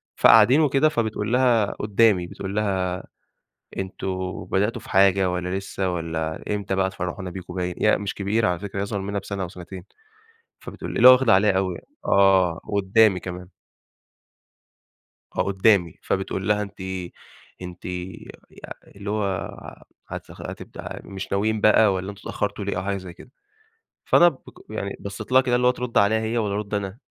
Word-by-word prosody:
فقاعدين 120 +7 +6
وكده 145 +1 +3
فبتقول 110 -3 -2
لها 125 -4 +4
قدامي، 105 -3 +2
بتقول 95 +2 -6
لها: 95 -3 -1 0.8
"أنتم 95 -1 -4
بدأتوا 105 +4 -1
في - - -12
حاجة 95 -1 +4
والّا 90 0 -3
لسه 95 -1 -3
والّا 80 -1 -4
إمتى 100 -2 -2
بقى 95 0 +1
تفرحونا 90 0 -5
بيكم؟" 90 -1 -8
باين، 90 -1 -2
هي 105 - +4
مش 100 -1 -4
كبيرة 105 +2 0
على 90 -1 -1
فكرة 100 -1 -6
هي - - 0
أصغر 100 -1 -3
مننا 100 +1 -3
بسنة 100 0 -5
أو - - -6
سنتين. 90 0 -10 0.8
فبتقول - - -8
ل - - -2
اللي 125 - +8
هو - - +11
واخدة 130 -3 +4
عليها 100 +2 +4
أوي 95 -1 0
يعني، - - -13 0.2
آه، 95 -4 +4
وقدامي 100 0 +3
كمان. 90 0 -7 1.9
آه - - +1
قدامي، 95 -3 +2
فبتقول 95 0 -2
لها، 105 0 +2
أنتِ 100 -1 -8 0.8
أنتِ 90 -1 -9
يا 90 0 -6 0.2
يا - - -10 0.2
اللي 100 0 -7
هو، 105 0 0 0.8
هتخ - - -9
هتبدأ - - -8
مش 95 -1 -8
ناويين 105 +2 0
بقى 105 -1 +5
والّا 95 +1 -4
أنتم 100 0 -14
اتأخرتوا 105 0 -3
ليه؟ 100 - -2
أو 90 - -2
حاجة 100 0 -1
زي 90 -2 -9
كده. 125 - -16 0.7
فأنا 175 - +6
بق 145 -6 -10
يعني 100 -2 -4
بصيت 100 +4 -7
لها 130 - +7
كده 125 -2 +1
اللي 125 0 +1
هو - - +6
ترد 125 -1 -1
عليها 110 +2 +3
هي 110 +2 -1
والّا 105 -3 -1
أرد 105 0 -4
أنا؟ 100 +1 -3
100 Hz, 175 wpm, -23 LUFS, 95-110 Hz, 1.9 s, هو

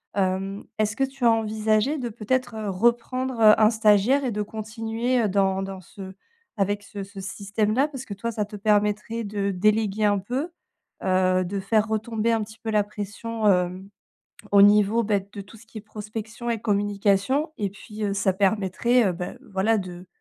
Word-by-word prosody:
Hem, 195 +1 -1 0.2
est-ce 215 0 +1
que 270 - 0
tu 270 -2 -2
as 230 - +7
envisagé 220 +5 +1
de, 250 - -3
peut-être, 240 +2 -2
heu, 215 -2 -4
reprendre, 240 +5 0
heu, 215 0 +7
un 215 -1 +6
stagiaire 220 +5 +3
et 245 - -1
de 210 0 -2
continuer, 225 +3 -2
heu, - - +2
dans 190 0 +1
dans 195 -1 -7
ce 190 +1 -10 0.4
avec 205 +1 0
ce 200 -1 -7
ce 195 0 -11
système-là? 210 +6 0
Parce 265 -3 -7
que 205 - -6
toi, 230 +4 -3
ça 210 -1 -1
te 210 +1 -10
permettrait 210 +2 +1
de 200 -1 -2
déléguer 215 +2 +1
un 205 -1 +3
peu, 255 - -3 0.5
heu, 185 -1 +2
de 195 +3 -3
faire 215 +2 +1
retomber 220 +1 -1
un 225 -1 +1
petit 220 +1 -12
peu 225 - -5
la 210 -1 +3
pression, 210 +2 -4
hem, 180 +1 0 0.6
au 200 -1 +7
niveau, 210 +3 +5
beh, 200 -2 0
de 200 - -6
tout 200 +3 -14
ce 225 +1 -18
qui 225 - -11
est - - -12
prospection 215 +2 -7
et 230 - -1
communication 205 +8 +1
et 205 -2 -1
puis, 210 +2 -9
heu, 200 - 0
ça 200 -1 +1
permettrait, 205 +4 +2
heu, 185 - +1
beh 180 +7 -6 0.2
voilà, 215 +4 +2
de, 180 -1 -8
210 Hz, 190 wpm, -24 LUFS, 200-225 Hz, 0.6 s, as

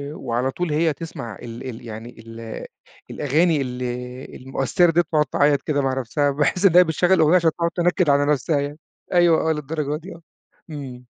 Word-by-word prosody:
وعلى 125 0 -2
طول 175 +2 -3
هي 160 +1 +2
تسمَع 130 -9 -7
ال 120 +2 -7
ال 120 0 -9
يعني 115 +2 -8
ال 115 0 -8 0.5
الأغاني 155 +2 +1
ال 125 -1 -5 0.6
المؤثِّرة 135 +6 +1
ديّة 170 +2 +3
وتقعُد 150 -2 +3
تعيَّط 145 +1 +2
كده 145 0 -1
مع 135 -1 0
نفسها، 140 +4 0
باحِس 150 +7 0
إنّها 180 -1 +7
بتشغِّل 175 +2 +1
الأغنية 160 -1 +4
عشان 165 -2 +4
تقعُد 170 +1 -2
تنكِّد 175 -1 +2
على 140 0 +4
نفسها 145 +1 +1
يعني. 145 +1 -4 0.4
أيوه 170 -2 +4
آه، 160 - +3
للدرجة 150 0 -3
دي 175 +5 -10
آه، 170 - -15 0.5
إمم. 130 -5 -8
150 Hz, 175 wpm, -22 LUFS, 130-165 Hz, 0.6 s, إنّها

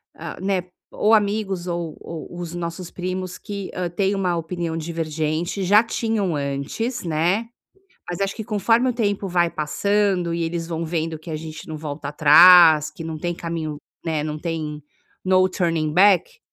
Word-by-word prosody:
hã, - - -7
né, 190 -2 0 0.3
ou 215 - +2
amigos 200 -4 +1
ou 170 -2 -4
ou 170 +1 -8
os 175 -1 -6
nossos 170 +1 -5
primos 185 0 -4
que 200 -2 -6
hã, 180 -1 -2
têm 195 +3 0
uma 185 -3 0
opinião 165 0 -3
divergente, 160 +2 -2
já 205 +4 +5
tinham 220 -6 -1
antes, 140 - -3
né. 175 +7 0 0.6
Mas 180 +2 -4
acho 195 0 -1
que 220 - -5
conforme 225 +4 +2
o - - +1
tempo 205 -4 -1
vai 175 -2 +1
passando 190 +3 0
e 170 0 -1
eles 165 0 -3
vão 165 -1 -3
vendo 160 -1 -2
que 155 - -14
a - - -3
gente 155 0 -8
não 155 - -6
volta 150 -1 -6
atrás, 155 +1 +7
que 155 - -10
não 160 -1 -5
tem 175 +2 -2
caminho, 165 -3 -4 0.3
né, 160 -3 -1
não 155 0 -4
tem 155 -2 -4 0.4
no 185 0 +4
turning 165 -4 -1
back, 185 +1 +4
175 Hz, 170 wpm, -22 LUFS, 160-195 Hz, 0.6 s, atrás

